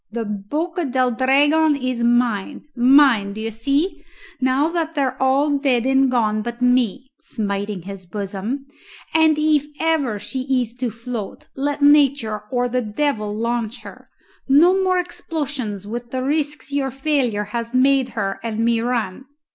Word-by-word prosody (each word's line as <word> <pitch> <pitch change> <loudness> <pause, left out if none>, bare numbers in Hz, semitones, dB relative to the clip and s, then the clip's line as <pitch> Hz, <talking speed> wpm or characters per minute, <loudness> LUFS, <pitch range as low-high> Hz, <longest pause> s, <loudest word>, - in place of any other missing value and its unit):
The 230 0 -3
Boca 300 - -3
del 255 -1 +1
Dragon 290 +5 +3
is 255 -3 -2
mine 240 +1 +1
mine, 245 -5 +5
d'ye 220 +2 -4
see, 285 - -1 0.4
now 260 +3 +2
that 330 -1 -2
they're 275 -3 0
all 280 +2 +2
dead 255 -4 +1
and 265 0 +3
gone 215 -4 +1
but 235 +2 -6
me" 250 0 +2 0.2
smiting 200 - -4
his 195 -1 -9
bosom 205 +7 -4 0.5
"and 320 -1 +4
if 305 -1 +2
ever 310 -9 +1
she 260 +5 -4 0.2
is 235 -2 -3
to 250 -1 -1
float, 230 -2 -7
let 285 +1 -2
nature 280 -7 +3
or 245 -1 0
the 250 +1 -1
devil 215 -1 -1
launch 235 0 -2
her: - - -12 0.4
no 350 +8 +5
more 370 -1 +2
explosions 285 - -4
with 235 +3 -6
the 255 +1 -3
risks 295 0 -2
your 275 -1 0
failure 265 -6 0
has 235 +1 -3
made 265 0 +3
her 195 -2 -2
and 225 -2 -4
me 235 -1 +2
run!" 235 -1 -2
255 Hz, 150 wpm, -21 LUFS, 225-285 Hz, 0.5 s, mine